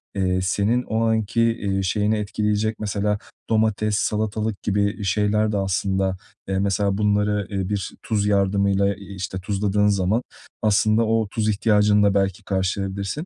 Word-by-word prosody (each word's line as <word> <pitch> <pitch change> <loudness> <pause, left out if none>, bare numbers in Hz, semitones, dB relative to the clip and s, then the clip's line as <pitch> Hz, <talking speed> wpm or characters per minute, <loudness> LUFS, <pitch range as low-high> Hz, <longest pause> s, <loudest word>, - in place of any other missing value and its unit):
eee, 95 -1 +1
senin 100 +6 +1
o 110 -1 -1
anki, 110 +1 +1
eee, 100 -4 0
şeyini 105 +3 +1
etkileyecek 105 +1 -1
mesela 105 0 -1 0.3
domates, 110 -1 +1
salatalık 110 -1 -1
gibi 100 +1 0
şeyler 105 +2 +1
de 105 - -1
aslında, 95 0 0 0.3
eee, 95 0 -1
mesela 100 0 0
bunları, 105 -1 +1
eee, 95 -2 -3
bir 100 -3 -2
tuz 105 -2 0
yardımıyla, 100 0 +2
eee, 100 0 -11
işte, 95 0 -4
tuzladığın 105 +2 +1
zaman 100 +4 +1 0.4
aslında 110 +1 +3
o 110 -1 +1
tuz 110 0 -1
ihtiyacını 105 0 +3
da 100 -1 +3
belki 95 -2 0
karşılayabilirsin. 95 0 -2
105 Hz, 145 wpm, -22 LUFS, 95-105 Hz, 0.4 s, aslında